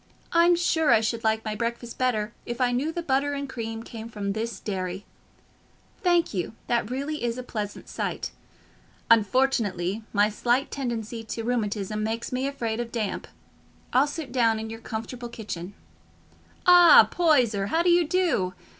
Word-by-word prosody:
"I'm 340 Hz, +1 st, +5 dB
sure 320 Hz, -2 st, +1 dB
I -, -, +6 dB
should 230 Hz, +1 st, -2 dB
like 220 Hz, 0 st, +1 dB
my 215 Hz, -, -2 dB
breakfast 235 Hz, +1 st, -4 dB
better 230 Hz, -4 st, 0 dB
if 240 Hz, 0 st, -5 dB
I 250 Hz, -1 st, +2 dB
knew 265 Hz, +6 st, 0 dB
the 345 Hz, +1 st, -4 dB
butter 280 Hz, -1 st, +1 dB
and 280 Hz, 0 st, -3 dB
cream 225 Hz, -3 st, -5 dB
came 230 Hz, -1 st, -8 dB
from 200 Hz, -3 st, -3 dB
this 220 Hz, -1 st, -4 dB
dairy. 185 Hz, -1 st, -4 dB, 1.0 s
Thank 350 Hz, -5 st, +2 dB
you, 185 Hz, +2 st, -3 dB
that 235 Hz, -3 st, 0 dB
really 280 Hz, +3 st, -3 dB
is 235 Hz, 0 st, -1 dB
a 255 Hz, -, -5 dB
pleasant 210 Hz, -4 st, -5 dB
sight. -, -, -3 dB, 0.8 s
Unfortunately, 220 Hz, -4 st, +2 dB
my 205 Hz, 0 st, +4 dB
slight 240 Hz, +5 st, 0 dB
tendency 235 Hz, -4 st, -4 dB
to 225 Hz, +1 st, -4 dB
rheumatism 215 Hz, -3 st, -1 dB
makes 225 Hz, +2 st, -3 dB
me 255 Hz, +2 st, -1 dB
afraid 235 Hz, -5 st, -3 dB
of 235 Hz, -1 st, -4 dB
damp: 220 Hz, -4 st, -3 dB, 0.7 s
I'll 265 Hz, +3 st, +4 dB
sit 290 Hz, -3 st, -6 dB
down 230 Hz, -3 st, +3 dB
in 220 Hz, 0 st, -5 dB
your 225 Hz, 0 st, -8 dB
comfortable 235 Hz, +2 st, -6 dB
kitchen. 200 Hz, -5 st, -7 dB, 0.9 s
Ah, 355 Hz, -1 st, +9 dB
Poyser, 250 Hz, -, +3 dB
how 325 Hz, +10 st, +1 dB
do 350 Hz, -, +4 dB
you 345 Hz, -2 st, +4 dB
do? 325 Hz, -, +1 dB
235 Hz, 165 wpm, -26 LUFS, 215-270 Hz, 1.0 s, Ah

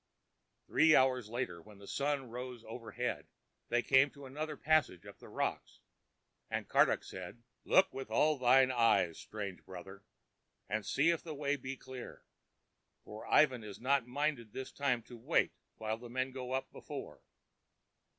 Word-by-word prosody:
Three 160 Hz, -1 st, +5 dB
hours 130 Hz, -4 st, +3 dB
later, 120 Hz, -7 st, -3 dB
when 105 Hz, +2 st, -15 dB
the 100 Hz, -, -13 dB
sun 140 Hz, 0 st, -1 dB
rode 125 Hz, -1 st, -6 dB
overhead, 120 Hz, +2 st, -4 dB, 0.4 s
they 120 Hz, 0 st, +2 dB
came 135 Hz, +1 st, +5 dB
to 140 Hz, 0 st, -12 dB
another 150 Hz, +3 st, -5 dB
passage 155 Hz, -, +2 dB
up -, -, -12 dB
the -, -, -13 dB
rocks, -, -, -3 dB, 0.7 s
and -, -, -2 dB
Karduk -, -, +4 dB
said: 95 Hz, +6 st, -9 dB, 0.2 s
"Look 190 Hz, 0 st, +5 dB
with 135 Hz, -3 st, -6 dB
all 150 Hz, +6 st, +3 dB
thine 130 Hz, +1 st, +5 dB
eyes, 115 Hz, -9 st, +3 dB
strange 100 Hz, -4 st, -6 dB
brother, 95 Hz, +1 st, -10 dB, 0.6 s
and 110 Hz, +1 st, -1 dB
see 145 Hz, -, +3 dB
if 170 Hz, -, -1 dB
the 160 Hz, -3 st, -7 dB
way 145 Hz, 0 st, 0 dB
be 130 Hz, 0 st, -6 dB
clear, 130 Hz, -1 st, -9 dB, 0.8 s
for 105 Hz, +1 st, -9 dB
Ivan 130 Hz, -6 st, +4 dB
is 105 Hz, -2 st, -8 dB
not 135 Hz, -1 st, +2 dB
minded 130 Hz, -4 st, -2 dB
this 130 Hz, -, -6 dB
time 130 Hz, -5 st, 0 dB
to 120 Hz, -, -12 dB
wait 115 Hz, -, +1 dB, 0.2 s
while 110 Hz, 0 st, -3 dB
men 130 Hz, +2 st, -1 dB
go 130 Hz, -1 st, -6 dB
up 130 Hz, -, -2 dB
before." -, -, -8 dB
125 Hz, 155 wpm, -34 LUFS, 110-140 Hz, 0.8 s, Three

